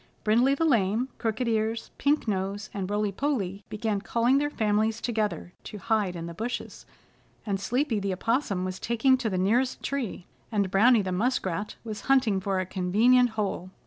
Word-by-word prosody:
Brindley 240 Hz, +6 st, +3 dB
the 325 Hz, -, 0 dB
Lame, 230 Hz, -2 st, +2 dB
Crooked 225 Hz, +1 st, -1 dB
Ears, 225 Hz, 0 st, -1 dB
Pink 290 Hz, -2 st, +1 dB
Nose 200 Hz, +1 st, -2 dB
and 195 Hz, -2 st, -3 dB
Rolly 205 Hz, 0 st, 0 dB
Polly 200 Hz, -6 st, -2 dB
began 215 Hz, -2 st, -2 dB
calling 240 Hz, +5 st, +2 dB
their 290 Hz, 0 st, 0 dB
families 220 Hz, -3 st, 0 dB
together 210 Hz, -7 st, -2 dB
to 210 Hz, -, -7 dB
hide 205 Hz, -3 st, 0 dB
in 165 Hz, -1 st, -5 dB
the 170 Hz, -, -6 dB
bushes, 230 Hz, +7 st, -5 dB, 0.6 s
and 200 Hz, -3 st, -1 dB
Sleepy 245 Hz, +3 st, 0 dB
the 200 Hz, -1 st, -2 dB
Opossum 200 Hz, -1 st, 0 dB
was 185 Hz, 0 st, -4 dB
taking 235 Hz, +3 st, +3 dB
to 235 Hz, -4 st, -1 dB
the 185 Hz, -, -2 dB
nearest 235 Hz, +8 st, +1 dB
tree, 250 Hz, -10 st, -3 dB, 0.3 s
and 200 Hz, -4 st, 0 dB
Browny 225 Hz, +2 st, +5 dB
the 185 Hz, -, -3 dB
Muskrat 205 Hz, -1 st, -1 dB
was 215 Hz, -3 st, -6 dB
hunting 250 Hz, -8 st, +4 dB
for 190 Hz, 0 st, -1 dB
a 185 Hz, -, -1 dB
convenient 220 Hz, +8 st, +3 dB
hole. 195 Hz, -3 st, -2 dB
215 Hz, 175 wpm, -27 LUFS, 195-245 Hz, 0.6 s, Browny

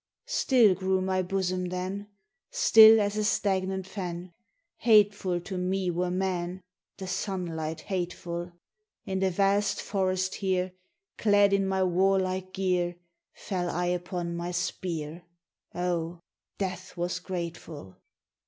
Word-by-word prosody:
"Still 255 Hz, -, +4 dB
grew 190 Hz, +1 st, 0 dB
my 185 Hz, 0 st, 0 dB
bosom 185 Hz, 0 st, -1 dB
then, 185 Hz, +3 st, -4 dB, 0.4 s
Still 225 Hz, -, +8 dB
as 205 Hz, 0 st, 0 dB
a 215 Hz, -, +1 dB
stagnant 190 Hz, -2 st, 0 dB
fen! 180 Hz, -2 st, -6 dB, 0.4 s
Hateful 205 Hz, -5 st, +3 dB
to 185 Hz, +1 st, -5 dB
me 185 Hz, 0 st, 0 dB
were 180 Hz, +1 st, -1 dB
men, 180 Hz, 0 st, -2 dB, 0.3 s
The 190 Hz, -, -6 dB
sunlight 165 Hz, -5 st, -3 dB
hateful! 175 Hz, -2 st, -3 dB
RAINBOW 175 Hz, -, -4 dB
GOLD 175 Hz, -, -20 dB, 0.5 s
In 190 Hz, 0 st, -2 dB
the 190 Hz, 0 st, +2 dB
vast 200 Hz, +2 st, +1 dB
forest 185 Hz, -1 st, -1 dB
here, 185 Hz, -1 st, 0 dB, 0.5 s
Clad 205 Hz, -2 st, +4 dB
in 195 Hz, -1 st, +2 dB
my 190 Hz, 0 st, +1 dB
warlike 185 Hz, 0 st, +1 dB
gear, 180 Hz, -2 st, 0 dB, 0.4 s
Fell 180 Hz, -3 st, -3 dB
I 175 Hz, +1 st, -1 dB
upon 175 Hz, -1 st, -3 dB
my 170 Hz, +1 st, -3 dB
spear, 175 Hz, -3 st, -3 dB, 0.5 s
Oh, 175 Hz, -1 st, -2 dB, 0.4 s
death 185 Hz, -2 st, -4 dB
was 175 Hz, +1 st, -2 dB
grateful! 170 Hz, -, -6 dB
185 Hz, 125 wpm, -28 LUFS, 175-195 Hz, 0.5 s, Still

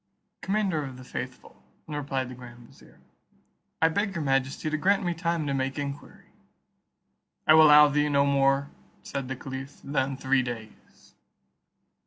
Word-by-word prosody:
"Commander 195 Hz, -6 st, 0 dB
of 130 Hz, -2 st, -8 dB
the 130 Hz, -, -11 dB
faithful," 125 Hz, 0 st, -8 dB, 0.3 s
replied 140 Hz, -4 st, -3 dB
the 130 Hz, -, -8 dB
grand 120 Hz, -1 st, -13 dB
vizier, -, -, -20 dB, 0.8 s
"I 160 Hz, -, +6 dB
beg 200 Hz, +3 st, -1 dB
your 165 Hz, -, -2 dB
majesty 135 Hz, +2 st, 0 dB
to 155 Hz, -, 0 dB
grant 195 Hz, +5 st, +2 dB
me 175 Hz, -1 st, 0 dB
time 170 Hz, -2 st, -2 dB
to 140 Hz, -, -1 dB
make 135 Hz, 0 st, -2 dB
enquiry." 140 Hz, 0 st, -7 dB, 1.2 s
"I -, -, +7 dB
will 155 Hz, 0 st, +8 dB
allow 150 Hz, 0 st, +8 dB
thee 150 Hz, +1 st, +1 dB
no 140 Hz, -1 st, +3 dB
more," 140 Hz, 0 st, +2 dB, 0.3 s
said 135 Hz, -2 st, -5 dB
the 130 Hz, -, -4 dB
caliph, 135 Hz, +1 st, -8 dB
"than 135 Hz, -1 st, -1 dB
three 135 Hz, 0 st, +2 dB
days." 115 Hz, -3 st, -9 dB
140 Hz, 155 wpm, -27 LUFS, 130-155 Hz, 1.2 s, will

